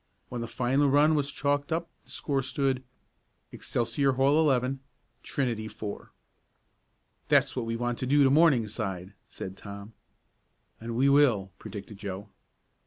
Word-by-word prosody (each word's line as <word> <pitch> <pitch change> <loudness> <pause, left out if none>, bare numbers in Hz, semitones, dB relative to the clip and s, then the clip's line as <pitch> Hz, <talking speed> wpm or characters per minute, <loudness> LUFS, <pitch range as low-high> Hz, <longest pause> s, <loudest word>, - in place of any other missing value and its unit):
When 120 -1 -4
the 115 - -4
final 130 +4 +1
run 145 +3 +5
was 145 -2 +1
chalked 145 +1 -1
up 165 +1 -1 0.2
the - - -18
score 140 -2 -1
stood: 130 0 -1 0.7
Excelsior 120 +4 0
Hall, 135 +4 +3
11; 135 -3 +2 0.4
Trinity, 120 -5 -2
4. 105 -1 -7 1.2
"That's - - +3
what 120 -3 -2
we 115 - -1
want 120 +1 -2
to 130 - -2
do 145 +2 +5
to 135 - +4
Morningside," 110 - +2 0.2
said 95 0 -7
Tom. 100 +2 -10 0.9
"And 115 +1 -5
we 130 +3 +3
will!" 125 -9 +4
predicted 100 0 -9
Joe. 100 0 -6
125 Hz, 140 wpm, -28 LUFS, 110-140 Hz, 1.2 s, run